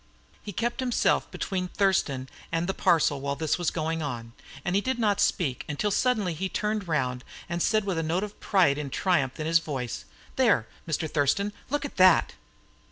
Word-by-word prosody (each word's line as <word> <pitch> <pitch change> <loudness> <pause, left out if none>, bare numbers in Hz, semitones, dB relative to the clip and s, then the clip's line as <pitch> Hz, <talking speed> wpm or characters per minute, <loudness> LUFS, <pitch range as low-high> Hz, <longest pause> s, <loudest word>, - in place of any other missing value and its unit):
He 205 - -7
kept 235 +6 -2
himself 255 -2 +1
between 185 -2 -3
Thurston 175 -9 +1 0.2
and 165 +1 0
the 195 - -1
parcel 150 -7 +2
while 140 0 -2
this 160 +3 -1
was 175 - +1
going 160 0 -2
on, 120 -6 -5 0.3
and 175 - 0
he 200 - +3
did 260 +3 -1
not 205 -3 +2
speak 135 -8 +1
until 180 +8 -1
he - - +1
suddenly 190 -8 0
turned 210 -1 -2
round, 125 -5 -1 0.2
and 170 +1 -2
said, 215 +2 +2
with 185 -5 -1
a - - +1
note 165 +4 0
of 210 0 -7
pride 175 -8 +3
and 140 -2 -5
triumph 160 -7 +1
in 155 - -2
his 165 +1 +4
voice: 135 -7 -4 0.3
"There, - - +3 0.2
Mr. 160 0 -1
Thurston, 155 +8 +1 0.2
look 290 +1 -1
at 285 - -8
that!" 185 -2 +5
170 Hz, 190 wpm, -27 LUFS, 145-200 Hz, 0.3 s, that